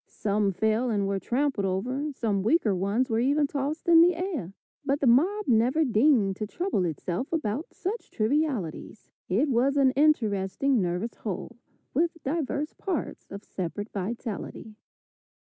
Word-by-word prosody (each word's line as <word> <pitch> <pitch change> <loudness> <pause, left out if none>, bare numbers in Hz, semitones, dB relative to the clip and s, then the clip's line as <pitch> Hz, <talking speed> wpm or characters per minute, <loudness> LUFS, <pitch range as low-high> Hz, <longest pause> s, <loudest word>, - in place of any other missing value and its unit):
Some 205 -1 0
fell 220 +6 +1
and 205 -3 0
were 195 0 -1
trampled 260 -1 0
over, 255 +11 -2
some 215 -7 -1
weaker 225 - +2
ones 200 +7 0
were 225 -3 0
even 285 +4 +2
tossed 285 +3 -3
in 335 -1 +8
the 350 +1 +5
air, 325 - -4 0.3
but 280 0 0
the 280 - 0
mob 355 - +3
never 250 +7 +3
deigned 225 -5 +3
to 215 - -3
trouble 345 - -1
itself 175 - -3
about 300 -3 -2
such 420 +6 -4
trivialities. 220 - -2 0.2
It 220 +12 +2
was 270 +2 +2
an 270 -2 +5
interesting, 255 -3 +2
nervous 180 +6 -2
whole, 210 +3 -6 0.4
with 330 +4 +1
divers 295 0 -2
parts 370 -6 -4
of 200 +1 -8
separate 200 +4 -5
vitality. 215 +1 -5
240 Hz, 145 wpm, -27 LUFS, 205-295 Hz, 0.4 s, in